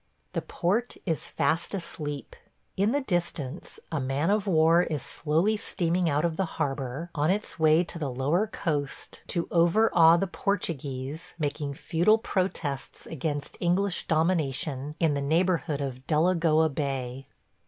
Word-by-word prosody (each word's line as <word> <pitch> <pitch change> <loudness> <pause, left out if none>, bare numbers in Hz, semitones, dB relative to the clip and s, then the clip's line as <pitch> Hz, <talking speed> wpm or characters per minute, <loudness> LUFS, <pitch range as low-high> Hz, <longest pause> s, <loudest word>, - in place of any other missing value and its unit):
The - - -1
port 210 +8 -1
is 165 -5 -1
fast 170 +5 0
asleep. 150 -5 -5 0.4
In 200 +3 +2
the 285 +2 +1
distance 170 - -3
a 160 - 0
man 135 +6 0
of 210 -1 +1
war 165 -1 +5
is 155 -6 -2
slowly 165 +8 +1
steaming 175 -4 0
out 145 +2 +1
of 165 -2 -1
the 190 - +1
harbor 140 +2 -3
on 150 0 +1
its 200 -1 -1
way 160 +2 +5
to 170 -1 -6
the 145 -4 -2
lower 145 - +1
coast 150 -9 -3
to 170 -3 -1
over 175 +6 +4
awe 165 0 +7
the 195 - +1
Portuguese 150 -7 -3
making 145 -2 -2
futile 175 +9 +3
protests 180 - -3
against 145 -1 -4
English 180 +2 0
domination 150 -3 0
in 160 -3 +3
the 140 - -1
neighborhood 160 -1 +1
of 130 -1 -5
Delagoa 160 -1 +3
Bay. 135 -3 -3
160 Hz, 145 wpm, -27 LUFS, 145-180 Hz, 0.4 s, awe